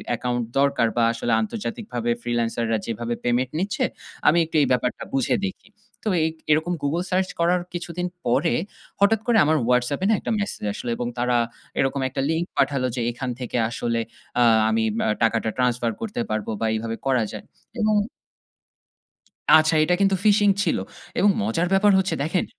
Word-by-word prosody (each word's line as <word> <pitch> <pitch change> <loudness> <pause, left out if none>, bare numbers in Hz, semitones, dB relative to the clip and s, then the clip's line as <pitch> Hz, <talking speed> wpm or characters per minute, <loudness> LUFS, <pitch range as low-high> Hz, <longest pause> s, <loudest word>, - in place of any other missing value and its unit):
account 120 +1 -2 0.2
দরকার 140 -4 +3
বা 120 - +4
আসলে 115 +1 -2
আন্তর্জাতিকভাবে 120 +1 -4
freelancer 120 -1 -1
রা 110 - +2
যেভাবে 115 +1 -3
payment 125 +1 +1
নিচ্ছে 200 +3 -1 0.4
আমি 165 - +6
একটু 160 0 -9
এই - - +3
ব্যাপারটা 125 0 0
বুঝে 135 -2 +2
দেখি। 190 0 -7 0.4
তো - - -4 0.2
এই 160 - +2 0.2
এরকম 160 +3 +2
Google 165 +5 0
search 185 0 +1
করার 175 +1 +2
কিছুদিন 175 0 -3 0.2
পরে 120 0 +2 0.5
হঠাৎ 200 +2 +4
করে 235 -2 +4
আমার 155 +1 +3
WhatsApp 125 +5 +1
এ - - +2
না - - +5
একটা - - -4
message 205 - -3
আসলো 120 - -5
এবং 120 - -2
তারা 120 0 +2 0.4
এরকম 135 +1 +1
একটা 135 +1 -3
link 165 +2 0
পাঠালো 135 -2 +2
যে 125 - -2
এখান 125 +2 -5
থেকে 125 0 -3
আসলে 115 0 -2 0.4
আ - - +4 0.3
আমি 110 0 +1 0.2
ম - - 0 0.2
টাকাটা 115 -1 +2
transfer 125 -2 +1
করতে 210 - -3
পারব 110 -1 -2
বা 115 - 0
এইভাবে 115 +1 -2
করা 130 -4 +3
যায় 105 - -8 0.3
এবং 215 -1 +2 1.6
আচ্ছা 155 0 +5
এটা 180 +3 +2
কিন্তু 195 -1 +4
phishing 205 -1 +5
ছিল, - - +1 0.4
এবং 205 - +5
মজার 165 - 0
ব্যাপার 205 +2 +5
হচ্ছে 190 0 +1
দেখেন। 170 +4 0
135 Hz, 175 wpm, -23 LUFS, 120-180 Hz, 1.6 s, আমি